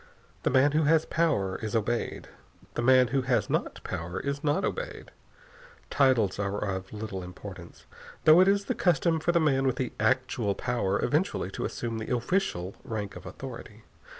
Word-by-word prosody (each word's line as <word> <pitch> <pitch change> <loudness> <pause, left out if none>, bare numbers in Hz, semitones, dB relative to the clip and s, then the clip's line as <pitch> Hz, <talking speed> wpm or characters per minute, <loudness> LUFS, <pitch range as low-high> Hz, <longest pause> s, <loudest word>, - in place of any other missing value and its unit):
The - - +1
man 135 +2 +4
who 155 +1 +2
has 160 +1 +4
power 140 - 0
is 110 +1 -3
obeyed. 115 +2 -1 0.5
The - - -2
man 130 0 +5
who 135 +2 +1
has 125 -5 0
not - - -2
power 85 +3 -4
is 140 +3 -3
not 150 +6 +1
obeyed. 485 +1 -5 0.8
Titles 125 -9 +3
are 100 0 -1
of 95 -2 -3
little 105 -3 -5
importance, 90 -1 -10 0.4
though 155 +3 +8
it 185 - +5
is 200 0 +3
the - - 0
custom 170 -2 +2
for 175 - +1
the 170 - +3
man 135 -4 +2
with 130 - +1
the 130 -1 -3
actual 130 -6 +1
power 100 -5 -1
eventually 145 - 0
to - - -4
assume 115 -1 -4
the 110 +3 -1
official 120 - -1
rank 110 -6 -4
of - - -9
authority. - - -9
125 Hz, 175 wpm, -28 LUFS, 100-150 Hz, 0.8 s, though